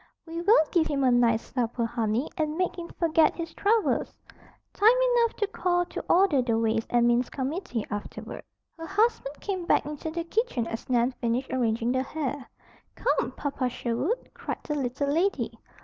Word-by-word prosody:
"We 335 0 -5
will 365 -3 +5
give 330 -3 +3
him 280 -2 0
a 255 - +4
nice 235 -2 +2
supper, 240 -2 0
honey, 230 +2 -1
and 310 -2 -1
make 365 -1 0
him 345 -1 -6
forget 325 -2 +3
his 335 -1 -5
troubles. 435 +1 +1 0.6
Time 425 - +5 0.3
enough 465 -1 +2
to 420 - 0
call 355 -3 0
to - - -6
order 350 -7 +4
the 235 -2 0
ways 225 0 0
and 240 -1 +3
means 240 +1 +2
committee 265 - -3
afterward." 205 0 -6 0.4
Her 325 - -6
husband 400 -8 0
came 370 -4 -4
back - - +3
into 300 +2 -5
the 335 +1 -3
kitchen 345 - -1
as 225 +2 -6
Nan 245 0 +3
finished 240 +2 -1
arranging 235 -1 +1
the 260 0 +1
hair. 280 -1 -4 0.5
"Come, - - 0
Papa 275 -3 -2
Sherwood!" 250 - -2
cried - - -5
the 300 - -3
little 275 0 -2
lady. 380 +5 +1
285 Hz, 175 wpm, -27 LUFS, 240-350 Hz, 0.6 s, will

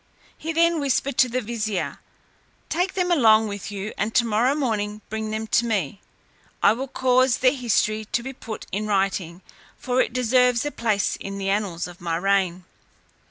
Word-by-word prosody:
He 325 - -5
then 335 0 +3
whispered 275 -1 0
to 255 - +5
the 255 +2 -1
vizier, 215 -4 -3 0.7
"Take 360 +3 -1
them 360 -1 0
along 220 -8 +5
with 205 -1 -6
you, 205 +1 -5
and 215 +2 -1
tomorrow 235 +3 +3
morning 215 -7 -2
bring 220 0 -3
them 220 +1 -3
to 235 - +3
me; 200 -5 -2 0.6
I 200 - +6
will 260 +4 -4
cause 255 -1 +2
their 255 -1 +3
history 220 -4 0
to 235 +3 -2
be 265 +1 -6
put 225 -4 -8
in 210 +3 -2
writing, 190 -3 -1 0.3
for 255 0 +1
it - - -1
deserves 250 0 +2
a 295 - -2
place 220 -6 0
in 195 0 -6
the 195 0 -2
annals 195 -5 -1
of 175 -1 -11
my 170 -1 -1
reign." 185 0 +1
220 Hz, 175 wpm, -23 LUFS, 200-255 Hz, 0.7 s, I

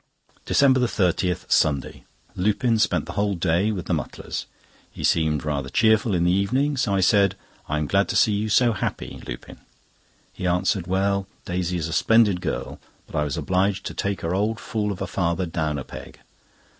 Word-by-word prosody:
DECEMBER 130 -3 +4
30, 90 -4 +1
Sunday.—Lupin 100 - 0
spent - - +1
the - - -7
whole 100 -1 0
day 90 +4 +1
with 95 -5 -4
the - - -1
Mutlars. 75 -6 -4 0.4
He - - -9
seemed 80 -2 +1
rather 70 -3 -2
cheerful 110 +1 +3
in 85 - +1
the 90 - +3
evening, 125 +10 +1
so 120 -6 0
I 95 - +2
said: 100 +1 +4 0.3
"I'm 75 0 0
glad 100 +6 +1
to - - -2
see 110 - +4
you 105 +1 -1
so 120 +2 +4
happy, 100 - -4
Lupin." - - -8 0.7
He 90 - -3
answered: 90 0 0
"Well, 100 +1 0 0.2
Daisy 90 -1 -2
is 80 -2 -2
a 80 - -5
splendid 105 -2 +3
girl, - - -4 0.3
but - - -11
I 75 - +2
was 75 -3 -3
obliged 95 +2 0
to - - -4
take 100 -2 -2
her 85 +2 -2
old 105 +4 0
fool 105 -3 -2
of 95 -1 -4
a - - -1
father 90 -1 -1
down 80 -3 -2
a 65 - -4
peg. - - -11
95 Hz, 180 wpm, -24 LUFS, 85-105 Hz, 0.7 s, DECEMBER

